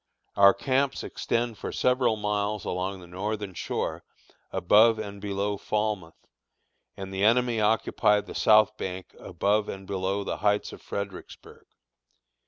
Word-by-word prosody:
Our 100 0 +7
camps 135 0 0
extend 115 -2 -2
for - - -5
several 125 -3 +2
miles 105 -1 -2
along 95 +1 -3
the - - -11
northern 100 +2 -4
shore - - -3 0.5
above 110 +5 +5
and 100 -2 -7
below 100 0 -2
Falmouth, 105 -5 -3 0.7
and 95 0 -7
the 95 +1 -1
enemy 120 +1 +3
occupy 105 -1 +2
the - - -10
south 110 -1 +4
bank 95 0 -6
above 100 +4 0
and 95 0 -7
below 95 +1 -2
the - - -3
Heights 105 0 0
of - - -11
Fredericksburg. 100 -2 -8
105 Hz, 135 wpm, -27 LUFS, 95-110 Hz, 0.7 s, Our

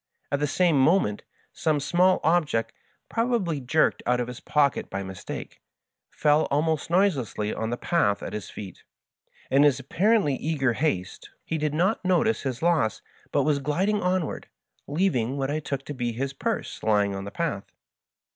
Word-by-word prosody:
At 140 - +1
the 150 - +1
same 170 -1 +2
moment 145 - +3 0.3
some 155 -2 0
small 175 +6 +3
object, 155 -8 +1 0.3
probably 230 - 0
jerked 145 +5 +2
out 125 0 +2
of 120 - -1
his 125 0 -7
pocket 145 -2 +1
by 100 - -4
mistake, 95 -2 -8 0.5
fell 150 +1 +2
almost 155 +1 0
noiselessly 145 - +1
on 110 - -3
the 120 - -2
path 110 -13 +1
at - - -6
his 105 - -5
feet. 95 -4 -9 0.7
In 135 +2 +5
his 145 -2 +4
apparently 185 - +2
eager 140 -5 0
haste 115 - -2 0.2
he 160 - -2
did 150 0 -1
not 190 +7 +1
notice 185 +5 +2
his 130 +1 -4
loss, 160 - +1 0.3
but - - +2
was 150 -2 +2
gliding 185 +9 0
onward, 180 -3 -1 0.4
leaving 140 -7 0
what 135 0 -1
I 155 - -1
took 140 -2 -4
to 145 - -5
be 120 -3 -2
his 135 +4 -3
purse 135 - -3
lying 105 -2 +2
on 95 0 -5
the - - -5
path. 150 -6 -3
145 Hz, 165 wpm, -26 LUFS, 125-170 Hz, 0.7 s, In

